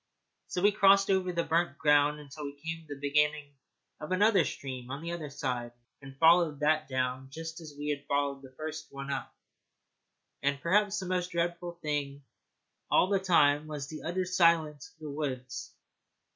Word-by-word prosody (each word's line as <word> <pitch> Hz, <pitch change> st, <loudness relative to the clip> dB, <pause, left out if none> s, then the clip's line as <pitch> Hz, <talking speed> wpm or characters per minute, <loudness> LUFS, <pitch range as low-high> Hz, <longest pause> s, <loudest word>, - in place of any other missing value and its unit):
So 180 Hz, -, -3 dB
we 205 Hz, -, +6 dB
crossed 195 Hz, 0 st, +5 dB
over 185 Hz, -1 st, +1 dB
the 170 Hz, -1 st, 0 dB
burnt 165 Hz, -3 st, 0 dB
ground 150 Hz, 0 st, +3 dB
until 150 Hz, +1 st, -9 dB
we 140 Hz, 0 st, -6 dB
came 165 Hz, +2 st, -5 dB
to 145 Hz, -, -6 dB
the -, -, -15 dB
beginning 150 Hz, 0 st, +1 dB, 0.5 s
of 150 Hz, -, -7 dB
another 200 Hz, 0 st, +4 dB
stream 130 Hz, -2 st, -6 dB
on 140 Hz, +4 st, -6 dB
the 170 Hz, -, -4 dB
other 165 Hz, -4 st, -5 dB
side, 125 Hz, -4 st, -3 dB, 0.3 s
and 135 Hz, -1 st, -12 dB
followed 165 Hz, -2 st, +5 dB
that 155 Hz, 0 st, +2 dB
down 130 Hz, 0 st, -2 dB
just 165 Hz, +3 st, -7 dB
as 155 Hz, -3 st, -10 dB
we 145 Hz, +1 st, -4 dB
had 145 Hz, -1 st, -3 dB
followed 140 Hz, -1 st, 0 dB
the 135 Hz, -1 st, -13 dB
first 155 Hz, 0 st, -6 dB
one 140 Hz, 0 st, -6 dB
up. 135 Hz, -, -4 dB, 1.1 s
And 140 Hz, 0 st, 0 dB
perhaps 205 Hz, +5 st, +2 dB
the 190 Hz, -, -3 dB
most 180 Hz, -1 st, -1 dB
dreadful 170 Hz, 0 st, -2 dB
thing 145 Hz, -2 st, -2 dB, 0.7 s
all 185 Hz, -, +4 dB
the 200 Hz, -1 st, +2 dB
time 155 Hz, -5 st, +3 dB
was 150 Hz, -2 st, -5 dB
the 155 Hz, -, -7 dB
utter 185 Hz, +3 st, -2 dB
silence 165 Hz, -5 st, +2 dB
of -, -, -33 dB
the 150 Hz, -2 st, -6 dB
woods. 130 Hz, -3 st, -4 dB
150 Hz, 180 wpm, -30 LUFS, 140-170 Hz, 1.1 s, we